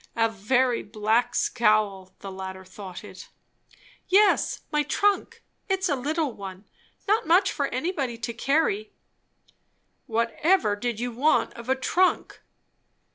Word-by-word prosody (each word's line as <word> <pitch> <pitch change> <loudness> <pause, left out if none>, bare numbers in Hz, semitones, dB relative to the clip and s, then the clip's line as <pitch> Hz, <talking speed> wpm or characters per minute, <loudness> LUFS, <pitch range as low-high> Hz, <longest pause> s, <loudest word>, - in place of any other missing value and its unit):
A 225 -1 +3
very 240 +4 +1
black 220 +4 0
scowl 210 -5 +1
the 195 - -7
latter 190 0 -7
thought 185 -1 -9
it. - - -11 0.8
"Yes, 405 +2 +3
my 300 -1 +2
trunk. 405 +6 0 0.3
It's 385 -1 0
a 285 - +2
little 295 +1 -1
one. 195 -1 -9 0.4
Not 425 -3 +2
much 370 +4 +4
for 280 -2 -1
anybody 270 -4 -2
to 235 +1 -4
carry." 240 -4 0 1.1
"Whatever 230 - +1
did 230 +1 -3
you 245 +1 -2
want 275 +7 +2
of 235 +1 -10
a 265 - +4
trunk?" 355 +8 0
240 Hz, 130 wpm, -25 LUFS, 210-310 Hz, 1.1 s, much